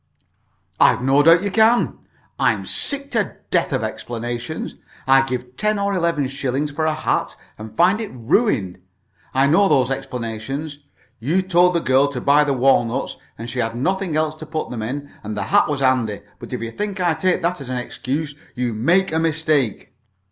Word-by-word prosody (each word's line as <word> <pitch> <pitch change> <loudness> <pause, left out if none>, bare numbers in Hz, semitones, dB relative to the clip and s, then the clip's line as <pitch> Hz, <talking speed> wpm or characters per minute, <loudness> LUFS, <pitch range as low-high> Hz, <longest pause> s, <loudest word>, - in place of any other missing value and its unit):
"I've - - +4
no 135 +2 +4
doubt 165 +4 +6
you 200 - -1
can. 225 +3 +3 0.4
I'm - - +1
sick 280 -1 -2
to 220 -5 -1
death - - +1
of - - -1
explanations. 120 +4 -5 0.3
I 135 0 +6
give 125 -1 -4
ten 215 0 +1
or 200 0 0
eleven 170 -6 0
shillings 135 +2 -2
for 155 +2 -2
a 155 - +2
hat, - - -1 0.2
and 110 0 -9
find 190 +6 +4
it 220 - -4
ruined. 115 - 0 0.6
I 135 +1 +4
know 180 +8 +4
those 135 -4 +3
explanations. 135 +3 -4 0.4
You 160 +11 +1
told 180 -1 +3
the 170 - +2
girl 130 +1 +3
to 125 - -3
buy 145 +3 +4
the 145 - 0
walnuts, 125 -3 +1 0.2
and 115 - -7
she 125 +1 -5
had 115 -1 -1
got - - -7
nothing 185 +4 -1
else 155 0 +1
to 155 - -9
put 155 0 -4
them 120 -3 -4
in, 140 +6 -5
and 105 0 -5
the - - -1
hat - - +3
was 145 -2 -2
handy; 125 -6 +1 0.2
but - - -10
if - - -3
you 115 - -5
think 205 - -4
I 175 -2 +2
take 180 +2 0
that 170 -2 -1
as 130 - -8
an 130 - -2
excuse, 140 +4 -3 0.2
you 125 -2 -1
make 170 - +2
a 160 - +1
mistake." 155 -8 0
145 Hz, 190 wpm, -21 LUFS, 125-170 Hz, 0.6 s, doubt